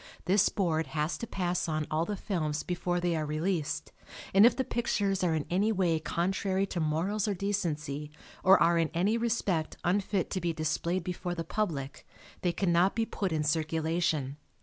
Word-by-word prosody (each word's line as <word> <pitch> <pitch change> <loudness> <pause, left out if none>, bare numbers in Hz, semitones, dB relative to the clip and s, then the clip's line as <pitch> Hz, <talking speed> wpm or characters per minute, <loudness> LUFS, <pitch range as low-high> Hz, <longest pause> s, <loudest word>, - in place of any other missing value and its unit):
This 195 +2 +4
board 165 -5 0
has 150 +2 0
to 235 - -4
pass 180 -4 -1
on 155 -1 -1
all 155 +2 +1
the 205 - -3
films 155 -7 -2
before 175 0 -1
they 175 -1 0
are 155 - -1
released 155 - -2 0.4
and 200 +4 +8
if 240 - +2
the 260 - 0
pictures 200 -6 0
are 170 -3 +2
in 155 - -1
any 200 +5 +2
way 180 -6 +1
contrary 190 +4 0
to 175 - -1
morals 170 +7 0
or 205 - 0
decency 150 -7 -2 0.3
or 190 +1 +7
are 170 0 +4
in 165 -2 +1
any 195 +6 +2
respect 220 -8 0
unfit 195 0 0
to 185 - -1
be 170 -1 0
displayed 160 +3 -1
before 180 0 -3
the 165 - -3
public, 165 -7 -3 0.4
they 175 - +1
cannot 175 +1 +2
be 225 0 +1
put 195 -4 -3
in 155 -1 0
circulation. 160 -2 0
175 Hz, 180 wpm, -30 LUFS, 155-195 Hz, 0.4 s, and